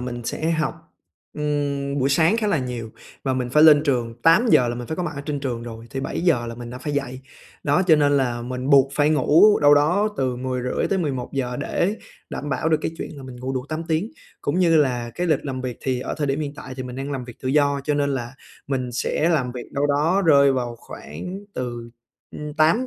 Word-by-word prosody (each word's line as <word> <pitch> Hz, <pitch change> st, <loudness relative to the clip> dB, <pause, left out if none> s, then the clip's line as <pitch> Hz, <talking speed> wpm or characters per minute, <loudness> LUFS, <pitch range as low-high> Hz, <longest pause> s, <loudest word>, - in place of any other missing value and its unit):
mình 120 Hz, -1 st, -5 dB
sẽ 160 Hz, +7 st, -2 dB
học, 160 Hz, -1 st, 0 dB, 0.6 s
ừm, 145 Hz, -1 st, -1 dB
buổi 135 Hz, +1 st, +2 dB
sáng 165 Hz, +9 st, +3 dB
khá 220 Hz, -2 st, 0 dB
là 185 Hz, -7 st, +2 dB
nhiều. 120 Hz, -3 st, -5 dB, 0.3 s
Và 130 Hz, -, +1 dB
mình 125 Hz, -1 st, -2 dB
phải 150 Hz, +4 st, +5 dB
lên 150 Hz, -2 st, +8 dB
trường 120 Hz, -5 st, 0 dB
8:00 165 Hz, -, +5 dB
là 120 Hz, -, -2 dB
mình 120 Hz, 0 st, -6 dB
phải 160 Hz, -, -4 dB
có 180 Hz, -, -2 dB
mặt 165 Hz, -2 st, -3 dB
ở 140 Hz, -, -5 dB
trên 145 Hz, -2 st, -2 dB
trường 120 Hz, -4 st, -3 dB
rồi, 115 Hz, -1 st, -9 dB
thì 135 Hz, -, -4 dB
7:00 140 Hz, -4 st, 0 dB
là 115 Hz, -, -5 dB
mình 120 Hz, 0 st, -8 dB
đã 125 Hz, -, -7 dB
phải 150 Hz, +1 st, -4 dB
dậy. 135 Hz, -2 st, -3 dB, 0.4 s
Đó, 145 Hz, +5 st, +2 dB
cho 160 Hz, -3 st, +6 dB
nên 145 Hz, -1 st, +3 dB
là 120 Hz, -3 st, 0 dB
mình 125 Hz, +2 st, -4 dB
buộc 140 Hz, -1 st, +5 dB
phải 145 Hz, +1 st, +3 dB
ngủ 155 Hz, +8 st, +5 dB
đâu 145 Hz, 0 st, +7 dB
đó 175 Hz, +9 st, +3 dB
từ 130 Hz, -2 st, -1 dB
10:30 125 Hz, 0 st, -2 dB
tới 195 Hz, -, +1 dB
11:00 130 Hz, -4 st, -2 dB
để 180 Hz, +8 st, -1 dB, 0.3 s
đảm 145 Hz, -, -5 dB
bảo 155 Hz, +3 st, 0 dB
được 155 Hz, -1 st, +3 dB
cái -, -, -2 dB
chuyện -, -, -4 dB
là 135 Hz, -, -9 dB
mình 130 Hz, -1 st, -9 dB
ngủ 130 Hz, +2 st, -4 dB
đủ 130 Hz, -1 st, -3 dB
8 155 Hz, +1 st, -3 dB
tiếng. 165 Hz, +7 st, 0 dB, 0.3 s
Cũng 145 Hz, +5 st, -1 dB
như 170 Hz, -3 st, +4 dB
là 125 Hz, -5 st, +1 dB
cái 180 Hz, -, -1 dB
lịch 155 Hz, -5 st, +1 dB
làm 130 Hz, -2 st, -4 dB
việc 125 Hz, -2 st, -4 dB
thì 130 Hz, -2 st, -1 dB
ở -, -, -4 dB
thời 145 Hz, -, 0 dB
điểm 140 Hz, +2 st, -1 dB
hiện 145 Hz, -1 st, -3 dB
tại 130 Hz, -, -8 dB
thì 130 Hz, -, -4 dB
mình 125 Hz, 0 st, -7 dB
đang 135 Hz, +2 st, -4 dB
làm 130 Hz, -2 st, -4 dB
việc 120 Hz, -2 st, -12 dB
tự 130 Hz, -, -2 dB
do, 140 Hz, 0 st, +2 dB
cho 150 Hz, -, +1 dB
nên 145 Hz, -1 st, +1 dB
là 125 Hz, -1 st, -4 dB, 0.3 s
mình 130 Hz, -3 st, -2 dB
sẽ 150 Hz, +6 st, 0 dB
làm 135 Hz, -7 st, +1 dB
việc 125 Hz, -2 st, -8 dB
đâu 140 Hz, +1 st, +1 dB
đó 155 Hz, +7 st, +2 dB
rơi 140 Hz, -3 st, +6 dB
vào 120 Hz, -2 st, -2 dB
khoảng 180 Hz, -, -8 dB, 0.2 s
từ, 120 Hz, -2 st, -5 dB, 0.4 s
ưm, 150 Hz, 0 st, -7 dB
tám 165 Hz, +11 st, +3 dB
140 Hz, 240 wpm, -23 LUFS, 125-155 Hz, 0.6 s, lên